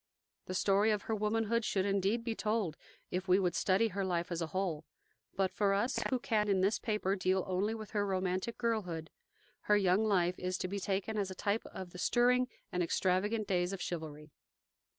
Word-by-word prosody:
The 185 - -4
story 200 +3 +3
of 210 -2 +1
her 225 - -2
womanhood 225 +2 +1
should 195 -3 0
indeed 200 +3 +1
be 230 -1 -1
told, 215 -7 -1 0.4
if 185 +1 -2
we 185 0 +5
would 180 -3 +1
study 200 +4 +2
her 195 0 -2
life 175 -1 -1
as 170 0 -2
a 165 - -1
whole; 175 -3 -2 0.5
but 190 -1 +1
for 200 -1 +2
us, 235 +7 0
who 260 - +2
can 215 -3 0
in 190 -2 +3
this 195 +4 +2
paper 210 -3 0
deal 185 -1 +1
only 195 +4 0
with 215 -2 -8
her 205 -1 +1
romantic 190 +2 -1
girlhood, 185 -9 -2 0.6
her 210 - +6
young 190 +1 +3
life 180 -4 +2
is 185 0 -2
to - - -2
be 200 +2 -3
taken 200 +3 -1
as 195 -2 -1
a 190 - -7
type 205 +3 -1
of 185 -2 -8
the 180 - -9
stirring 250 +4 +3 0.2
and 180 - 0
extravagant 190 +5 +1
days 180 0 +1
of 195 - -4
chivalry. 155 -3 -5
195 Hz, 200 wpm, -33 LUFS, 180-215 Hz, 0.6 s, her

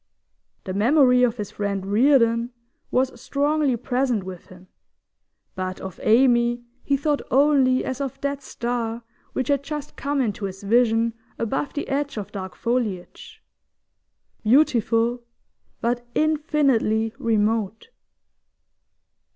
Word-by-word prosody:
The 185 - -5
memory 250 +4 +4
of 245 -1 +2
his 210 -2 -5
friend 200 -2 -3
Reardon 230 +2 +3 0.4
was 255 -2 0
strongly 290 -2 +1
present 250 -3 0
with 185 -2 -9
him, 185 0 -15 0.9
but 185 0 -4
of 190 -2 -8
Amy 240 0 +3 0.2
he 280 - +1
thought 290 +1 0
only 270 -2 +3
as 260 +1 -4
of 275 -3 -4
that 280 0 -2
star 235 -2 -3 0.3
which 260 - -2
had 280 -2 +2
just 295 0 -6
come 285 0 -1
into 210 -5 -1
his 195 +1 -7
vision 230 +1 +2 0.2
above 270 +5 -2
the 295 - -3
edge 285 -1 -2
of 205 - -5
dark 190 -2 -6
foliage 240 - -3 1.0
beautiful, 235 -1 +3 0.6
but 240 +1 0
infinitely 285 -8 +1
remote. 220 - 0
240 Hz, 120 wpm, -23 LUFS, 215-275 Hz, 1.0 s, memory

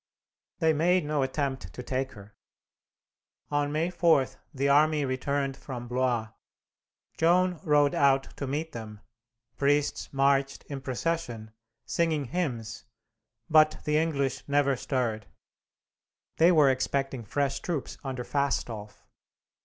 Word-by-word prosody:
They 160 -2 +3
made 175 +2 +2
no 150 -1 0
attempt 135 - -2
to 125 - -7
take 130 +1 -2
her. 105 0 -14 1.2
On 145 0 +1
May 160 +4 0
4 165 -6 +4 0.3
the 140 -2 -1
army 150 +1 +4
returned 135 +1 -1
from 125 -3 -7
Blois. 125 -3 0 0.9
Joan 180 +1 +3
rode 145 -4 +3
out 135 -1 +2
to 140 - -4
meet 155 +4 -3
them, 110 -4 -8 0.6
priests 145 +1 +1
marched 135 0 +1
in 140 -2 -7
procession, 130 -5 -3 0.3
singing 160 -4 0
hymns, 120 -7 -3 0.6
but 155 0 +5
the 150 0 +2
English 140 -5 -1
never 140 -1 +2
stirred. 120 -5 -2 1.1
They 170 +2 +6
were 150 -5 +5
expecting 135 -1 -1
fresh 140 +5 -1
troops 165 -6 -4
under 130 -2 -4
Fastolf. 120 -7 -2
140 Hz, 120 wpm, -28 LUFS, 130-155 Hz, 1.2 s, They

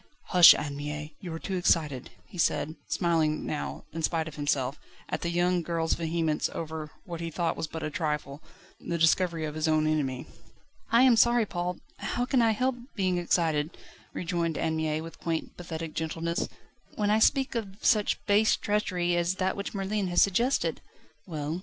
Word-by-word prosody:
Hush, 180 -3 +9
Anne 145 -1 -4
Mie! 150 +1 -5
you 180 - -7
are 165 - -4
too 190 +3 -4
excited," 150 -7 +1 0.2
he 185 -6 -11
said, 155 -1 +1
smiling 160 -3 +1
now, 150 - -4
in 165 - -4
spite 160 0 0
of 160 - -7
himself, 145 -2 -1 0.3
at - - -3
the 170 - -1
young 175 +1 +2
girl's 165 -1 0
vehemence 160 -2 0
over 160 -1 -5 0.2
what 170 -3 -6
he 165 - -3
thought 165 +1 -1
was 160 - -3
but 160 +1 -6
a 155 - -3
trifle 150 -2 -3 0.4
the 170 - -3
discovery 165 0 +2
of 150 - -4
his 155 +1 -1
own 155 -1 +3
enemy. 140 -5 -1 0.7
"I 235 +2 +6
am 255 -3 +6
sorry, 235 0 +4
Paul. 180 -2 -3 0.2
How 245 - -2
can 255 -1 +2
I 230 - +4
help 255 +3 0 0.2
being 185 -4 +1
excited," 160 -3 0 0.3
rejoined 170 -2 -2
Anne 160 -1 0
Mie 155 0 -1
with 165 +1 -10
quaint, 165 -1 -3
pathetic 165 -2 -6
gentleness, 165 +1 -2 0.5
"when 210 -1 +1
I 215 - +4
speak 270 +4 +3
of 205 -5 -4
such 210 -2 +2
base 210 +2 +4
treachery, 180 -4 0
as 175 +1 +1
that 190 0 0
which 200 +1 -5
Merlin 195 0 -1
has 175 -1 +1
suggested?" 235 +8 +1 0.5
"Well? 155 0 -3
170 Hz, 180 wpm, -28 LUFS, 155-190 Hz, 0.7 s, Hush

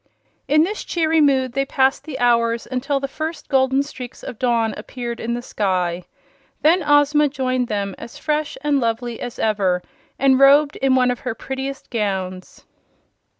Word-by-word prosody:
In 305 +2 +4
this 415 +5 -3
cheery 320 -2 +1
mood 265 -4 +2
they 275 - +1
passed 270 -1 +1
the 305 -4 -6
hours 235 -1 +2
until 275 +2 -1
the 275 - -3
first 315 +4 -6
golden 265 0 +3
streaks 255 -4 -9
of 225 - -8
dawn 235 -3 +1
appeared 235 +2 -6
in 235 +1 -2
the 240 - -5
sky. 180 -5 -1 0.6
Then 335 +4 +5
Ozma 290 0 +4
joined 255 -2 -1
them, 200 -2 -2
as 235 - -10
fresh 305 -1 -2
and 290 -1 +1
lovely 230 0 -2
as 245 -1 -6
ever 195 -5 +1 0.3
and 265 -1 +4
robed 280 +2 +6
in 265 -1 +2
one 250 -1 +3
of 245 - -4
her 250 -3 -4
prettiest 270 +2 -6
gowns. 190 -5 -3
260 Hz, 165 wpm, -21 LUFS, 230-285 Hz, 0.6 s, robed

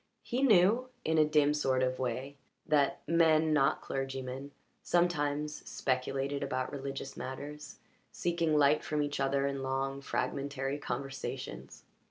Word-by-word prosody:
He 250 +2 -2
knew, 230 +1 +5 0.2
in 160 0 +2
a 155 - +6
dim 150 -1 +3
sort 130 -3 +1
of 130 0 0
way, 130 +2 -3 0.3
that 145 -2 +2
men 160 -2 +4
not 150 0 +3
clergymen 135 0 -4 0.3
sometimes 150 -4 +1
speculated 135 +2 -1
about 130 -2 -2
religious 135 -1 -5
matters, 145 +3 -7 0.3
seeking 170 -3 +1
light 145 +1 +4
from 150 -1 0
each 145 -1 -3
other 135 0 +1
in 140 -1 -2
long, 135 +1 -2
fragmentary 140 0 -2
conversations. 130 - -5
140 Hz, 130 wpm, -32 LUFS, 135-150 Hz, 0.3 s, a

